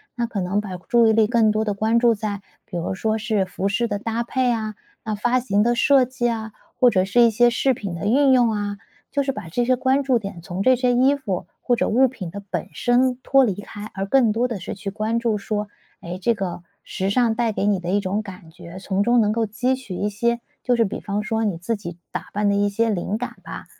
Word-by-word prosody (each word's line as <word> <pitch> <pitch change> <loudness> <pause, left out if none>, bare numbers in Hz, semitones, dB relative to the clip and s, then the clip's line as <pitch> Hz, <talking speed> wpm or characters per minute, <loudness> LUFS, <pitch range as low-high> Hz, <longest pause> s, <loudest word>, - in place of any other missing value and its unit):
那 240 - -1
可 210 -4 -3
能 185 +3 0
把 200 -3 -5
注 230 +6 +3
意 220 - +4
力 220 -1 +4
更 230 -1 +3
多 215 +1 +1
地 210 -2 -1
关 220 +3 +1
注 235 0 +4
在 205 -2 -4 0.2
比 185 - -9
如 170 +2 -2
说 220 +3 -1
是 215 -3 0
服 190 +1 -2
饰 235 +4 0
的 205 - -2
搭 225 +3 -2
配 250 +1 0
啊、 215 -2 -3 0.3
那 215 -1 -2
发 240 +5 +1
型 210 -4 +1
的 240 +1 +2
设 270 +2 +5
计 250 -1 -1
啊， 220 -1 -4 0.3
或 250 - +6
者 185 -5 +2
是 220 +5 +3
一 235 - +7
些 240 +3 +4
饰 260 +3 +1
品 200 -7 -5
的 170 - -5
运 265 +5 +4
用 245 -3 +4
啊。 205 -1 -3 0.3
就 280 - +1
是 270 0 -1
把 165 - -8
这 240 +9 0
些 255 +1 +3
关 260 +2 +1
注 260 -3 +2
点 195 -5 -7
从 180 +3 -4
这 255 +2 +5
些 250 0 +2
衣 260 +3 +4
服 205 - -4
或 245 - +1
者 - - 0
物 260 +4 +4
品 205 -10 -7
的 200 +2 -7
本 175 -4 -3
身 250 +6 +2
脱 270 +1 +4
离 210 -7 +1
开， 205 +1 -9
而 195 0 -3
更 235 +1 +3
多 235 +4 +1
的 235 -4 -4
是 - - -5
去 195 +1 -5
关 215 +3 -1
注 230 -3 0
说， 210 0 -3 0.3
诶， 175 +1 -6
这 215 +6 +1
个 180 -4 -5 0.2
时 190 -1 -2
尚 230 +1 +2
带 235 -1 +1
给 200 - -2
你 205 -1 +3
的 175 -1 -5
一 200 +2 +2
种 200 +1 -1
感 185 -5 -11
觉， 175 +1 -11
从 195 +1 -1
中 240 +2 +3
能 210 -1 +2
够 230 0 +1
汲 245 +5 0
取 255 -8 -8
一 205 - -1
些 235 +3 0 0.2
就 245 -1 +2
是 230 - +3
比 195 - -5
方 205 0 -2
说 225 +1 -1
你 200 -6 -1
自 205 +7 -2
己 175 -5 -8 0.2
打 - - -5
扮 205 0 0
的 200 - +2
一 205 0 +2
些 225 +3 0
灵 200 +1 -1
感 245 +2 -5
吧。 - - -8
220 Hz, 275 characters per minute, -22 LUFS, 200-240 Hz, 0.3 s, 一